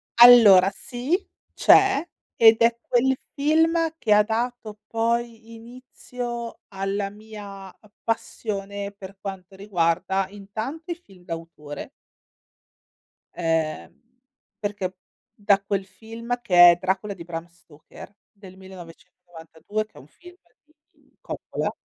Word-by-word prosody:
Allora 225 -6 +9
sì, 250 +7 -2 0.4
c'è, 390 -6 +5 0.3
ed 225 0 +6
è 230 0 +4
quel 265 +2 +1 0.2
film 320 +2 +2
che 215 -3 +3
ha 210 0 +6
dato 225 -1 -4
poi 230 0 -2
inizio 240 0 -8
alla 195 +1 -3
mia 205 -2 -10
a 205 +2 -19
passione 200 -3 -4
per 195 -1 -12
quanto 190 -1 -8
riguarda, 190 0 0
intanto 220 - -7
i - - -2
film 195 - -20
d'autore 165 - -8 1.4
ehm, 165 -2 -2 0.7
perché 200 -3 -4 0.4
da 200 -2 +2
quel 195 -1 -2
film, 230 +5 -6
che 175 -5 +8
è - - +2
Dracula 190 +3 -2
di 170 -3 -10
Bram 165 -1 -6
Stoker, 170 +3 -16 0.2
del 195 -3 -15
1992, 180 +1 -8
che 215 - -33
è - - -10
un - - -16
film 355 0 -16 0.3
di 310 +2 -34
Coppola - - -4
205 Hz, 115 wpm, -24 LUFS, 190-235 Hz, 1.4 s, Allora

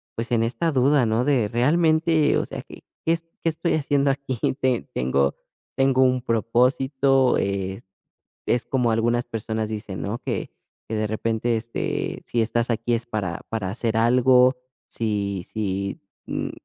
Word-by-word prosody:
pues, 115 +1 -4
en 115 -1 +3
esta 125 +8 0
duda, 135 0 +4
¿no?, 110 +2 +1
de 130 -7 +2
realmente, 155 +5 +3
o - - 0
sea, - - -6
¿qué - - -14 0.2
qué 165 - +3
es 165 - -3 0.2
qué 165 - +3
estoy 160 +2 -1
haciendo 140 -2 +2
aquí? 135 -2 -4 0.2
¿Te 130 -2 +2
tengo 70 +2 +1 0.4
tengo 135 -1 +4
un 130 -1 +2
propósito? 130 +3 +2
Eh, 95 +1 -2 0.7
es 120 - +1
como 125 -3 +1
algunas 120 +2 +1
personas 110 -1 -3
dicen, 105 -3 -5
¿no? 105 +4 -3
Que - - -3 0.4
que, 110 - -3
de 110 0 -1
repente, 115 +2 0
este, 115 +1 -3
si 115 -1 +1
estás 115 +2 0
aquí 115 +1 0
es 115 +1 -3
para 100 -7 -3
para 100 -5 -3
hacer 115 +1 -2
algo, 125 +2 +5 0.3
si 100 -4 -2
si, 100 -2 -3 0.3
mm, - - -3
120 Hz, 160 wpm, -24 LUFS, 110-130 Hz, 0.7 s, algo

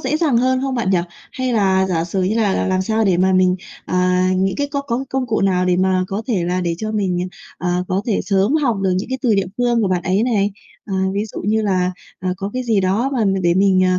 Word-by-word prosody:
dễ 305 - 0
dàng 305 -7 +2
hơn 255 +1 +2
không 270 -1 -1
bạn 220 -6 0
nhỉ? 185 - +3 0.3
Hay 255 -1 -2
là 190 -3 +2
giả 170 -3 0
sử 185 +2 -2
như 195 +4 0
là 210 -4 +2
làm - - 0
làm 185 0 +1
sao 220 +2 0
để 185 -3 +3
mà 190 +1 +3
mình, 185 0 +3 0.3
à, 180 0 +1
những 190 +1 0
cái 285 0 0
có 280 -1 -2
có 260 0 -2
công 265 -1 -1
cụ 220 -2 0
nào 185 -2 +2
để 180 -1 +2
mà 185 0 +2
có 200 +3 -3
thể 195 -9 0
là 180 +1 -1
để 170 -1 -1
cho 215 0 -3
mình, 185 -3 -1 0.3
ờ, 180 0 -1
có 190 +2 0
thể 220 - +1
sớm 200 +7 +1
học 265 -9 +1
được 190 - +2
những 200 - -5
cái 260 0 -2
từ 230 -4 +3
địa 195 -2 +1
phương 240 -2 +1
của 195 - +1
bạn 180 -2 0
ấy 190 +4 +1
này? 210 -5 +1 0.3
À, 195 - -5 0.2
ví 205 +2 0
dụ 220 - -7
như 220 +1 +1
là, 185 -3 +1 0.3
ờ, 185 - -2
có 195 +2 -4
cái 255 0 -2
gì 225 -5 +1
đó 205 +9 +1
mà 235 -5 +1
mình 195 -1 +1
để 170 0 +3
mình, 190 -1 +3
ờ, 185 0 +2
195 Hz, 275 wpm, -19 LUFS, 185-230 Hz, 0.3 s, nhỉ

